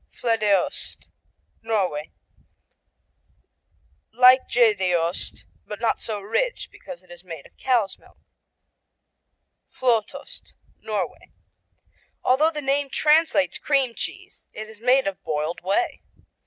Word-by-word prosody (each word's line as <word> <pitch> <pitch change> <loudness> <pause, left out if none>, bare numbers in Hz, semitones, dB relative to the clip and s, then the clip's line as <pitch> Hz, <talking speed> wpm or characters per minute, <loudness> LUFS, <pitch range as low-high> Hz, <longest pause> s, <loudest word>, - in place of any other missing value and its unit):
Floedeost 215 -5 0 0.5
Norway 190 -9 -1 2.0
Like 255 +3 +6
Gjedeost, 185 -7 +1 0.2
but 210 - -6
not 230 -1 0
so 215 -2 -3
rich 485 - -1
because 265 -7 -11
it's 175 -1 -14
made 165 -6 -9
of - - -19
cow's 235 -7 +1
milk. - - -22 1.6
Fløtost 235 -5 -1 0.2
Norway - - -4 0.9
Although 280 +5 +4
the 305 -2 -5
name 275 +1 +1
translates 300 0 +3
Cream 275 -4 +1
Cheese - - -7
it 215 0 -7
is 220 -1 -14
made 255 +3 +4
of 195 -4 -3
boiled 155 +2 -2
whey. 195 - 0
225 Hz, 100 wpm, -24 LUFS, 190-265 Hz, 2.0 s, Like